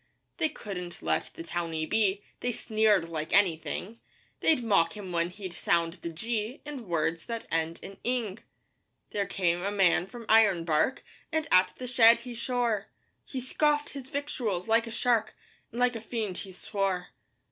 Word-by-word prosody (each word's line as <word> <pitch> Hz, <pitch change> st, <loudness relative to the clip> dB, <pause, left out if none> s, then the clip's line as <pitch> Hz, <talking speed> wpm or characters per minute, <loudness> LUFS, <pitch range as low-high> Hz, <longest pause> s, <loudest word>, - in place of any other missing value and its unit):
They 315 Hz, -, +2 dB
couldn't 180 Hz, -, -7 dB
let -, -, +1 dB
the -, -, -6 dB
towny 165 Hz, -2 st, -2 dB
be 205 Hz, +2 st, +1 dB, 0.2 s
They 245 Hz, -, -1 dB
sneered 215 Hz, -6 st, +2 dB
like 155 Hz, -2 st, -4 dB
anything; 195 Hz, +3 st, +1 dB, 0.4 s
They'd 305 Hz, -7 st, +3 dB
mock 195 Hz, -4 st, +3 dB
him 195 Hz, -3 st, -7 dB
when 170 Hz, 0 st, +1 dB
he'd 185 Hz, -1 st, -7 dB
sound 165 Hz, 0 st, +1 dB
the 170 Hz, -, -4 dB
'g' 225 Hz, -, -3 dB
In 275 Hz, -7 st, -7 dB
words 165 Hz, -1 st, -1 dB
that 230 Hz, -1 st, -4 dB
end 165 Hz, 0 st, 0 dB
in 195 Hz, -, -8 dB
'ing.' 230 Hz, -5 st, -1 dB, 0.7 s
There 200 Hz, -1 st, -1 dB
came 175 Hz, -2 st, +1 dB
a 195 Hz, -, 0 dB
man 190 Hz, -3 st, +3 dB
from 235 Hz, +1 st, -10 dB
Ironbark, 195 Hz, -, +4 dB, 0.3 s
And 315 Hz, 0 st, 0 dB
at 185 Hz, 0 st, +5 dB
the 255 Hz, -, -6 dB
shed 235 Hz, -2 st, +7 dB
he 245 Hz, 0 st, -7 dB
shore; 235 Hz, -3 st, -1 dB, 0.4 s
He 265 Hz, -, -5 dB
scoffed 295 Hz, +3 st, +1 dB
his 270 Hz, -2 st, -8 dB
victuals 245 Hz, -, -2 dB
like 230 Hz, +1 st, +3 dB
a -, -, -6 dB
shark, 230 Hz, -1 st, +1 dB, 0.4 s
And 235 Hz, -, -6 dB
like 250 Hz, -1 st, +3 dB
a 225 Hz, -, -4 dB
fiend 220 Hz, -4 st, -3 dB
he 195 Hz, -, -7 dB
swore. 190 Hz, -1 st, -2 dB
210 Hz, 170 wpm, -29 LUFS, 175-240 Hz, 0.7 s, shed